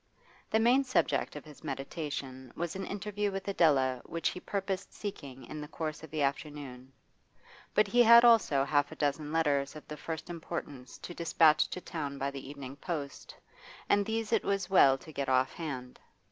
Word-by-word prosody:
The 220 Hz, -, +2 dB
main 245 Hz, +4 st, +4 dB
subject 255 Hz, -, 0 dB
of 150 Hz, -, -8 dB
his 150 Hz, 0 st, -14 dB
meditation 135 Hz, -3 st, -5 dB
was 170 Hz, +1 st, -3 dB
an 195 Hz, 0 st, -4 dB
interview 205 Hz, 0 st, -2 dB
with 195 Hz, 0 st, -5 dB
Adela 135 Hz, -9 st, +3 dB
which 165 Hz, -, -1 dB
he -, -, -6 dB
purposed 195 Hz, 0 st, -3 dB
seeking 140 Hz, -10 st, -7 dB
in 155 Hz, -, -7 dB
the 150 Hz, -, -6 dB
course 155 Hz, 0 st, -5 dB
of 160 Hz, -, -10 dB
the 155 Hz, -1 st, -1 dB
afternoon. 140 Hz, -2 st, -4 dB, 0.8 s
But 210 Hz, -, +5 dB
he 240 Hz, +5 st, +4 dB
had 235 Hz, 0 st, +9 dB
also 220 Hz, -13 st, +5 dB
half 145 Hz, +1 st, +1 dB
a -, -, -8 dB
dozen 145 Hz, 0 st, -1 dB
letters 145 Hz, -4 st, +1 dB
of 155 Hz, -, -11 dB
the 150 Hz, -, -7 dB
first 160 Hz, 0 st, -5 dB
importance 160 Hz, -6 st, -6 dB
to 175 Hz, -, -8 dB
despatch 165 Hz, -2 st, +4 dB
to 180 Hz, -, -5 dB
town 145 Hz, -6 st, -5 dB
by 140 Hz, 0 st, -2 dB
the 135 Hz, -1 st, -8 dB
evening 140 Hz, -1 st, -8 dB
post, 145 Hz, -3 st, -5 dB, 0.5 s
and 205 Hz, -, +4 dB
these 225 Hz, +1 st, -2 dB
it -, -, +3 dB
was 195 Hz, -2 st, -1 dB
well 135 Hz, -8 st, +6 dB
to 155 Hz, -, -13 dB
get 140 Hz, -2 st, -2 dB
off 130 Hz, 0 st, +2 dB
hand. 135 Hz, -7 st, -6 dB
155 Hz, 185 wpm, -31 LUFS, 140-190 Hz, 0.8 s, had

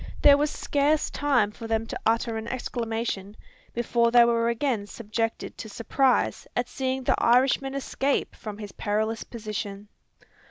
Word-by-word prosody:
There 285 Hz, -, +9 dB
was 295 Hz, +1 st, +1 dB
scarce 295 Hz, +1 st, +1 dB
time 255 Hz, -8 st, +2 dB
for 225 Hz, +2 st, -8 dB
them 225 Hz, 0 st, 0 dB
to -, -, -5 dB
utter 230 Hz, 0 st, +1 dB
an 220 Hz, +1 st, -4 dB
exclamation, 225 Hz, -5 st, -3 dB, 0.3 s
before 235 Hz, 0 st, +1 dB
they 240 Hz, 0 st, +7 dB
were 235 Hz, 0 st, +2 dB
again 235 Hz, -3 st, -1 dB
subjected 225 Hz, +1 st, -3 dB
to 220 Hz, -, -6 dB
surprise 250 Hz, +4 st, +1 dB
at 245 Hz, 0 st, 0 dB
seeing 260 Hz, 0 st, -2 dB
the -, -, +1 dB
Irishman 270 Hz, +3 st, +3 dB
escape 275 Hz, 0 st, -1 dB
from 210 Hz, -2 st, -7 dB
his 205 Hz, -2 st, -7 dB
perilous 220 Hz, +2 st, -1 dB
position. 210 Hz, -3 st, -6 dB
235 Hz, 150 wpm, -26 LUFS, 220-260 Hz, 0.3 s, There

